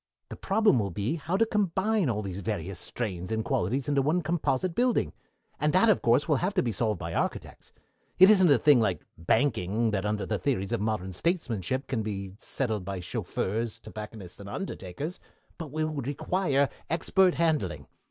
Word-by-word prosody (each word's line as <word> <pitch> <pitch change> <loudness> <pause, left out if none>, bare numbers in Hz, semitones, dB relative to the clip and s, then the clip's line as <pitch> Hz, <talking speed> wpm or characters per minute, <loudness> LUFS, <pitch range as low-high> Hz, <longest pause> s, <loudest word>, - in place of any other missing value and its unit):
The - - -6
problem 210 - +3
will 100 -2 -1
be 105 - -2
how 165 +5 -2
to 225 - +4
combine 205 - +1
all 105 -2 -1
these 95 -1 -5
various 95 -3 -4
strains 95 -5 -4
and 110 0 -1
qualities 125 +9 0
in 140 -2 +2
one 165 +5 +1
composite 165 +1 0
building, 245 +5 +1 0.5
and 150 0 +1
that, 220 +5 +6
of 210 - +4
course, 120 +5 +3
will 150 -4 +3
have 185 +7 -1
to 185 - +3
be 120 - -1
solved 110 0 0
by - - -5
architects. - - -3 0.5
It 185 - +9
isn't 190 -5 +5
a 140 - +6
thing 145 +1 +5
like 100 -6 0
banking 110 - +1
that 95 -2 -1
under 105 -1 -1
the 105 -2 -2
theories 110 -8 -1
of 120 -3 0
modern 105 -4 -2
Statesmanship 130 - -1
can 125 -4 -2
be 100 -3 -4
settled 110 -8 -2
by 95 0 -4
chauffeurs, 105 +5 -3
tobacconists, 105 -4 -9
and 100 0 -9
undertakers, 145 - -5 0.4
but 160 -3 -5
will 155 +2 -1
require 140 +1 0 0.2
expert 180 +3 +3
handling. 160 -3 0
125 Hz, 180 wpm, -28 LUFS, 100-165 Hz, 0.5 s, It